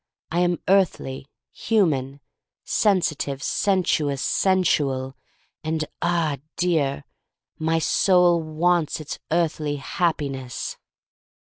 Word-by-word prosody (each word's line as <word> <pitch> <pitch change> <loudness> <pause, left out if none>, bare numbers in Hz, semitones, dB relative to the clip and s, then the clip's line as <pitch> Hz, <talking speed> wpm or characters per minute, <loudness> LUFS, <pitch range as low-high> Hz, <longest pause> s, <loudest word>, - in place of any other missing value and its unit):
I 170 - +1
am 175 -1 +2
earthly, 170 -8 +1 0.2
human 145 - 0 0.2
— - - -67
sensitive, 155 -9 0
sensuous, 160 -8 +1
sensual, 140 -9 +1 0.5
and, 155 0 -1 0.2
ah, 170 -4 +1 0.2
dear, 155 -6 0 0.6
my 160 +1 +1
soul 175 +1 +3
wants 160 +1 0
its 155 - -6
earthly 155 -3 0
Happi 150 0 -1
ness! 130 -2 -6
160 Hz, 95 wpm, -23 LUFS, 140-175 Hz, 0.6 s, soul